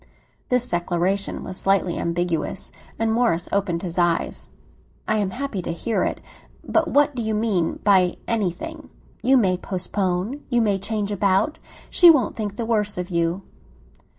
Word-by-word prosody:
This 250 -1 +2
declaration 175 +3 -1
was 185 - -4
slightly 195 -3 +1
ambiguous, 170 -1 -2 0.3
and 225 0 +1
Morris 225 -8 +1
opened 190 -4 0
his 175 -1 -3
eyes. 175 -1 0 0.6
"I 215 - +2
am 205 -3 0
happy 245 -3 -4
to 170 - -4
hear 215 +7 -1
it! - - -2 0.5
But 330 0 +2
what 290 0 +3
do 245 - -3
you 220 -1 -1
mean 210 -6 0
by 190 -3 +4
'anything'?" 230 - -3 0.3
"You 265 +2 +4
may 185 -6 +2
postpone—you 190 +8 -2
may 205 -4 +2
change 210 +1 -2
about; 200 +8 +1 0.3
she 350 - +8
won't 275 -10 +4
think 205 -2 -4
the 230 - -3
worse 210 -3 0
of 180 +1 -4
you." 170 +2 0
200 Hz, 150 wpm, -23 LUFS, 180-230 Hz, 0.6 s, she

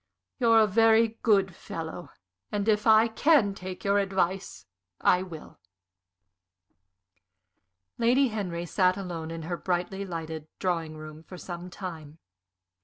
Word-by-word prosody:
You're 230 -2 +5
a - - +6
very 225 +2 +3
good 195 -5 +2
fellow, 165 +2 -7 0.4
and 205 0 -2
if 210 0 +2
I 220 +1 +6
can 230 -3 +3
take 185 -1 -8
your 200 0 +3
advice, 190 - -2 0.3
I 180 - +3
will." 170 - -10 2.4
Lady 250 +3 +3
Henry 180 -6 -4
sat 185 +1 +2
alone 170 -4 -5
in 165 0 -6
her 175 +2 -3
brightly 185 +2 -2
lighted 160 -4 -6
drawing 165 -4 -2
room 155 0 -10
for 180 +3 -11
some 175 0 -7
time. 165 -5 -8
185 Hz, 125 wpm, -27 LUFS, 170-210 Hz, 2.4 s, a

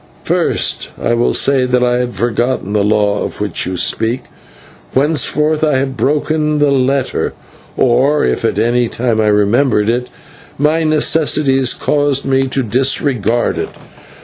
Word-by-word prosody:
First, - - 0
I 120 - 0
will 120 +1 +1
say 135 -2 +2
that 125 0 +1
I 120 0 +1
had 125 -2 -3
forgotten 120 0 -1
the 105 -1 +1
law 105 0 +1
of - - -6
which 105 -5 -2
you 90 0 -3
speak, 115 +7 0 0.7
whereof 150 +2 +1
I 150 -4 +2
have 135 0 -2
broken 150 +4 0
the 145 -1 +2
letter, 135 0 0 0.4
or, 130 +4 +2
if 60 - -1
at - - 0
any 120 +1 +1
time 115 -1 -1
I 105 - +1
remembered 105 +2 +2
it, 125 +1 -3 0.5
my 150 +3 +1
necessities 150 -4 +2
caused 145 -2 0
me 135 0 +1
to 130 0 -2
disregard 120 -1 0
it. - - -3
130 Hz, 150 wpm, -14 LUFS, 115-145 Hz, 0.7 s, say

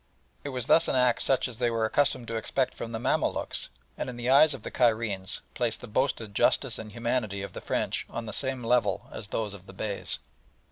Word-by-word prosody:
It 145 - -4
was 125 -3 -2
thus 165 - +5
an - - +1
act 125 -2 +4
such 135 0 +2
as 120 -2 -9
they 120 -1 +2
were 115 -1 +1
accustomed 130 0 +1
to 115 - -3
expect 130 +3 0
from 115 - -6
the 115 - -2
Mamaluks, 115 - 0 0.3
and, - - -3
in 125 - -7
the 120 +1 0
eyes 145 +1 +7
of - - -11
the - - -5
Cairenes, 110 -6 +1
placed 120 -3 -1
the - - -8
boasted 110 -2 -1
justice 120 +3 +2
and 110 -1 -7
humanity 115 -3 -1
of 100 - -7
the - - -7
French - - -1
on 115 - -5
the 105 - -5
same 130 0 0
level 115 -5 +2
as 105 - -5
those 105 0 -2
of 100 -1 -12
the - - -11
Beys. 105 -2 -2
115 Hz, 225 wpm, -28 LUFS, 110-125 Hz, 0.3 s, eyes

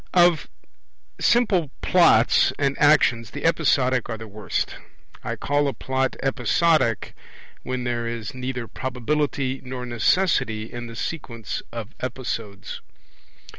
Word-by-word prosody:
Of 175 -3 +5 0.7
simple 205 - +3
Plots 165 -11 +5
and 140 -1 +1
actions 130 -7 +4
the 145 - -6
episodic 130 -7 +2
are 115 - -3
the 110 0 -9
worst. 105 0 -3 0.5
I - - -3
call 145 0 +1
a 140 - -2
Plot 130 0 -1
episodic 135 - +2 0.5
when 130 -1 -3
there 120 -1 -2
is 115 +3 -5
neither 125 -2 -4
probability 130 +1 -2
nor 125 -1 -5
necessity 120 - +1
in 120 0 -6
the 115 - -9
sequence 115 -7 -4
of 115 -1 -7
episodes. 115 -5 -5
130 Hz, 120 wpm, -24 LUFS, 115-145 Hz, 0.7 s, Of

